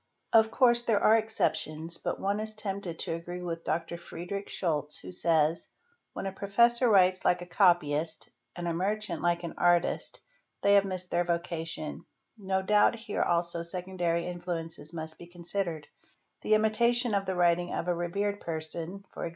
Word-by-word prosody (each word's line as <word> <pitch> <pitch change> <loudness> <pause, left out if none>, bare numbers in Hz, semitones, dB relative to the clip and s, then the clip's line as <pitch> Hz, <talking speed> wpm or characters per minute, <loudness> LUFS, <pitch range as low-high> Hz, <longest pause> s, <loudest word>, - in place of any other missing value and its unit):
| - - -42
Of 220 -1 +6
course 240 0 +4
there 225 -4 +2
are 220 - +5
exceptions 170 -7 -1
but - - -3
one 200 +2 0
is 215 0 -2
tempted 195 -5 -3
to - - -2
agree 175 +2 -6
with 165 -1 -4
Dr. 165 +1 -2
Frederic 195 +4 -6
Scholz 150 -4 -2
who - - -9
says 165 -2 +1 0.2
'' 475 - -43
When - - -5
a 195 - -2
professor 235 +6 +3
writes 185 -2 +4
like 175 0 +2
a - - -9
copyist 165 -4 +2
— - - -49
and 175 -1 -4
a 170 - 0
merchant 195 0 -2
like 175 0 +1
an:artist 175 +1 +1 0.4
they 200 0 +5
have 200 -1 +6
missed 185 -2 -4
their 175 - +2
vocation"; 170 -2 -3 0.3
no 190 -3 -1
doubt 210 +4 +4
here 220 -2 -3
also 170 0 +1
secondary 175 -1 -1
influences 170 -3 -5
must 160 -1 -5
be 170 - -10
considered: 175 -2 -4 0.5
the 215 - +3
imitation 235 +2 +2
of 195 -1 0
the 190 - -1
writing 175 0 +2
of 170 - -3
a 175 - +2
revered 200 +4 -2
person, 165 +4 -5 0.2
e.g. - - -2
175 Hz, 175 wpm, -29 LUFS, 170-200 Hz, 0.5 s, Of